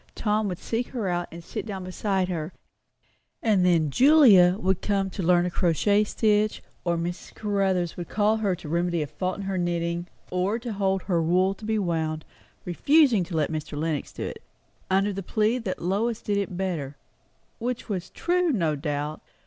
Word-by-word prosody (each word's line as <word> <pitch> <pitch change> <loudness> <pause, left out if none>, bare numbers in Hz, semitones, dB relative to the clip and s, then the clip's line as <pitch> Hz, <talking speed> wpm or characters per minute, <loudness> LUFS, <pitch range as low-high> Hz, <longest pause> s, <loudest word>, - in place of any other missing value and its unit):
Tom 210 -1 0
would 180 -3 -3
seek 235 +5 -2
her 230 -6 -3
out 175 -1 -1
and 170 0 -9
sit - - -5
down 195 -4 -6
beside 185 0 -1
her; 170 -2 -3 0.9
and 210 -5 +3
then 165 -5 +3
Julia 225 - +6
would 190 -3 0
come 195 -2 0
to 195 - -4
learn 175 0 +3
a 180 - -2
crochet 200 +5 +2
stitch, 215 0 +1 0.2
or 170 -1 0
Mrs. 175 +1 -5
Caruthers 195 -5 0
would 175 - -6
call 215 +1 +2
her 200 -4 0
to 170 - -11
remedy 170 0 0
a - - -3
fault 180 +6 -3
in 200 - -5
her 195 -1 -2
knitting, 170 0 -1 0.2
or 185 +4 0
to 235 -1 -5
hold 195 -1 0
her 175 -4 +1
wool 180 +4 +2
to 210 - -11
be 220 0 0
wound; 160 -5 -1 0.4
refusing 250 - +4
to 165 -1 -4
let 155 0 +1
Mr. 155 -1 -4
Lenox 155 -1 -3
hold - - -3
it, - - -10 0.5
under 195 +2 +2
the 195 - -4
plea 215 +6 +1
that 195 -8 -4
Lois 210 +6 0
did 205 -1 0
it 190 -3 -3
better; 160 -8 -3 0.6
which 245 +1 -3
was 190 -5 -3
true, 355 -1 +1
no 165 - +1
doubt. 150 +1 -3
185 Hz, 190 wpm, -26 LUFS, 170-210 Hz, 0.9 s, Julia